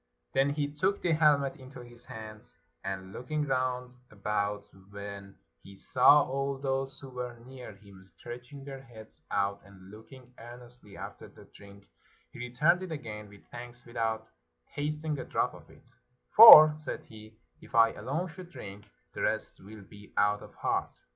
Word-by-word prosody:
Then 135 Hz, +1 st, +3 dB
he 145 Hz, 0 st, -1 dB
took 190 Hz, +6 st, -1 dB
the 175 Hz, -, +1 dB
helmet 150 Hz, -3 st, +3 dB
into 130 Hz, -1 st, -12 dB
his 120 Hz, 0 st, -15 dB
hands, 110 Hz, -1 st, -11 dB, 0.3 s
and 95 Hz, 0 st, -5 dB
looking 150 Hz, +4 st, -3 dB
round 130 Hz, -2 st, -2 dB, 0.2 s
about, 105 Hz, 0 st, -2 dB, 0.2 s
when 100 Hz, -1 st, -9 dB, 0.2 s
he 100 Hz, -, -14 dB
saw 135 Hz, +8 st, +5 dB
all 135 Hz, +1 st, -2 dB
those 135 Hz, 0 st, -3 dB
who 135 Hz, -, -10 dB
were 125 Hz, -1 st, -6 dB
near 125 Hz, -4 st, -11 dB
him 100 Hz, -2 st, -17 dB
stretching 125 Hz, +7 st, -11 dB
their 135 Hz, -1 st, -8 dB
heads 115 Hz, -5 st, -15 dB
out 100 Hz, 0 st, -1 dB
and 95 Hz, -1 st, -16 dB
looking 125 Hz, +4 st, -15 dB
ear 120 Hz, +1 st, -10 dB
nestly 120 Hz, -4 st, -15 dB
after -, -, -9 dB
the -, -, -17 dB
drink, 100 Hz, 0 st, -16 dB, 0.4 s
he -, -, -12 dB
returned 145 Hz, +9 st, +2 dB
it 185 Hz, -2 st, -6 dB
again 105 Hz, -8 st, -7 dB
with 100 Hz, -1 st, -17 dB
thanks 120 Hz, 0 st, -10 dB
without 110 Hz, -1 st, -3 dB, 0.5 s
tasting 150 Hz, +1 st, -3 dB
a -, -, -4 dB
drop -, -, -1 dB
of -, -, -15 dB
it: -, -, -19 dB, 0.3 s
" 125 Hz, 0 st, -40 dB
For," 155 Hz, -9 st, +12 dB
said 155 Hz, -1 st, -6 dB
he, 110 Hz, 0 st, -14 dB
" -, -, -39 dB
if 120 Hz, -, -11 dB
I 115 Hz, 0 st, +6 dB
alone 140 Hz, -, -3 dB
should 175 Hz, +1 st, -11 dB
drink, 100 Hz, -, -10 dB, 0.3 s
the -, -, -6 dB
rest -, -, -2 dB
will 105 Hz, +1 st, -12 dB
be 105 Hz, +2 st, -16 dB
out 105 Hz, 0 st, +2 dB
of -, -, -14 dB
heart." -, -, -2 dB
120 Hz, 175 wpm, -29 LUFS, 105-140 Hz, 0.5 s, For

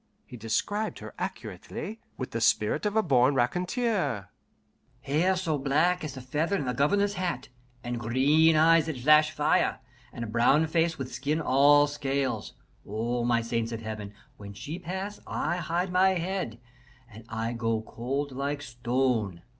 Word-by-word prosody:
He -, -, -11 dB
described 125 Hz, -, -2 dB
her -, -, -9 dB
accurately, 220 Hz, +2 st, -6 dB, 0.2 s
with -, -, -5 dB
the -, -, -3 dB
spirit -, -, +2 dB
of 205 Hz, -, -3 dB
the 220 Hz, -, +3 dB
born 135 Hz, -3 st, +3 dB
raconteur: 175 Hz, -, 0 dB, 0.7 s
"Hair 165 Hz, +7 st, +1 dB
so 165 Hz, -5 st, -1 dB
black 155 Hz, +7 st, +2 dB
as 150 Hz, -3 st, -5 dB
the 130 Hz, -, -7 dB
feather 150 Hz, +9 st, -1 dB
in 165 Hz, -, -2 dB
the 125 Hz, -, -1 dB
Governor's 200 Hz, +10 st, +2 dB
hat, 180 Hz, -9 st, -3 dB, 0.3 s
and 120 Hz, 0 st, -3 dB
green 145 Hz, +8 st, +4 dB
eyes 165 Hz, +1 st, +5 dB
that 155 Hz, -4 st, -3 dB
flash 155 Hz, +4 st, +5 dB
fire, 155 Hz, +4 st, +1 dB, 0.3 s
and 120 Hz, -, -6 dB
a -, -, -4 dB
brown 120 Hz, +8 st, +3 dB
face 165 Hz, 0 st, +1 dB
with 130 Hz, -1 st, -6 dB
skin 140 Hz, +5 st, -1 dB
all 145 Hz, 0 st, +5 dB
scales. 140 Hz, -2 st, -2 dB, 0.3 s
Oh, 115 Hz, +3 st, -2 dB
my 120 Hz, -1 st, +2 dB
saints 115 Hz, 0 st, -2 dB
of 115 Hz, -1 st, -5 dB
Heaven, 110 Hz, -2 st, -6 dB, 0.3 s
when 100 Hz, -1 st, -9 dB
she 150 Hz, -, -6 dB
pass 190 Hz, +4 st, -5 dB
I 175 Hz, -, -1 dB
hide 175 Hz, +2 st, -2 dB
my 190 Hz, +1 st, +4 dB
head, 175 Hz, -, -3 dB, 0.5 s
and 110 Hz, -1 st, -13 dB
I 115 Hz, +1 st, -2 dB
go 115 Hz, -2 st, -1 dB
cold 135 Hz, +6 st, -3 dB
like 140 Hz, +2 st, -3 dB
stone. 120 Hz, -7 st, -1 dB
140 Hz, 160 wpm, -28 LUFS, 120-170 Hz, 0.7 s, eyes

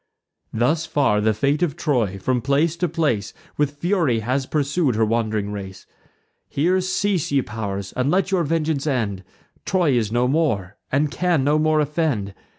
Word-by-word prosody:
Thus 155 Hz, +9 st, +1 dB
far 135 Hz, -10 st, +2 dB
the 110 Hz, +1 st, +3 dB
fate 140 Hz, +8 st, 0 dB
of 170 Hz, -6 st, 0 dB
Troy, 115 Hz, -, 0 dB
from 125 Hz, +6 st, 0 dB
place 145 Hz, +6 st, +1 dB
to 180 Hz, 0 st, 0 dB
place, 145 Hz, -, -1 dB, 0.2 s
With 145 Hz, 0 st, -1 dB
fury 165 Hz, -, +1 dB
has 130 Hz, +4 st, -1 dB
pursued 145 Hz, -2 st, 0 dB
her 110 Hz, 0 st, +3 dB
wand'ring 110 Hz, -2 st, -1 dB
race. 95 Hz, -2 st, -7 dB, 0.6 s
Here 180 Hz, +6 st, +1 dB
cease, 190 Hz, -2 st, 0 dB
ye 140 Hz, -2 st, +2 dB
pow'rs, 100 Hz, -4 st, -5 dB
and 130 Hz, +2 st, 0 dB
let 190 Hz, +3 st, +1 dB
your 185 Hz, -3 st, +2 dB
vengeance 155 Hz, -2 st, -1 dB
end: 105 Hz, -9 st, -1 dB, 0.4 s
Troy 180 Hz, -6 st, +2 dB
is 115 Hz, -4 st, +1 dB
no 120 Hz, +2 st, +2 dB
more, 120 Hz, -, 0 dB, 0.2 s
and 145 Hz, +2 st, +1 dB
can 175 Hz, -6 st, +1 dB
no 150 Hz, +2 st, +2 dB
more 155 Hz, 0 st, +2 dB
offend. 145 Hz, -10 st, -1 dB
140 Hz, 165 wpm, -22 LUFS, 110-160 Hz, 0.6 s, the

